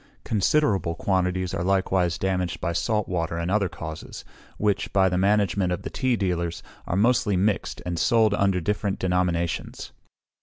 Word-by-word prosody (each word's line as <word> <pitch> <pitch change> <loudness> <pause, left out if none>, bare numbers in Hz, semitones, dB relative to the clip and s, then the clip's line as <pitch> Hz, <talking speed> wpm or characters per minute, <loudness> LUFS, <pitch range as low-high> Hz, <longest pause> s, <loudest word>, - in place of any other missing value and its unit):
Considerable 100 - +1
quantities 95 0 0
are 85 - -2
likewise 95 -2 +1
damaged 90 -1 -1
by 85 -2 -2
salt 105 +4 0
water 85 -2 -2
and 85 +2 -2
other 100 -2 +2
causes, 80 -1 -8 0.3
which, 105 -2 0
by 95 -1 +4
the 90 - 0
management 100 -1 +2
of 90 - -3
the - - -5
tea 130 -2 +1
dealers, 85 -5 -2 0.2
are 90 - -1
mostly 110 -2 +2
mixed, 100 +2 -1
and 85 -2 -2
sold 110 -3 +3
under 100 -2 +2
different 100 +2 -1
denominations. 90 -2 -1
95 Hz, 155 wpm, -25 LUFS, 85-100 Hz, 0.3 s, by